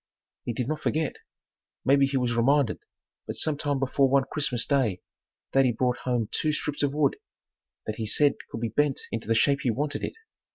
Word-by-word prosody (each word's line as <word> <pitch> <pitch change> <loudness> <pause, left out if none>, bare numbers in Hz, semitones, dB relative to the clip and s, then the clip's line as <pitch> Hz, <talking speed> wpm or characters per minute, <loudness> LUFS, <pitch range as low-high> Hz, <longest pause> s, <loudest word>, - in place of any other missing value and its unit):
He 120 - -2
did 125 +1 -2
not 155 +1 -2
forget. 155 -1 -1 0.7
Maybe 140 0 +5
he 135 0 -1
was 125 -2 0
reminded, 130 0 +2 0.5
but - - -4
some 155 -2 +1
time 145 -1 -1
before 135 0 +2
one 135 0 +4
Christmas 125 -6 0
day 125 -11 +1 0.5
daddy 135 -2 +4
brought 125 +1 0
home 120 -4 -1
two 155 -1 +1
strips 150 -1 -2
of 145 -1 +2
wood 150 -3 +2 0.7
that 110 - -4
he 110 - -3
said 145 +6 +3 0.2
could 115 - -6
be 115 - -1
bent 145 0 +1
into 115 -2 -4
the 115 - +2
shape 140 +5 +3
he 125 - 0
wanted 145 +5 -2
it. - - -2
135 Hz, 195 wpm, -27 LUFS, 120-145 Hz, 0.7 s, Maybe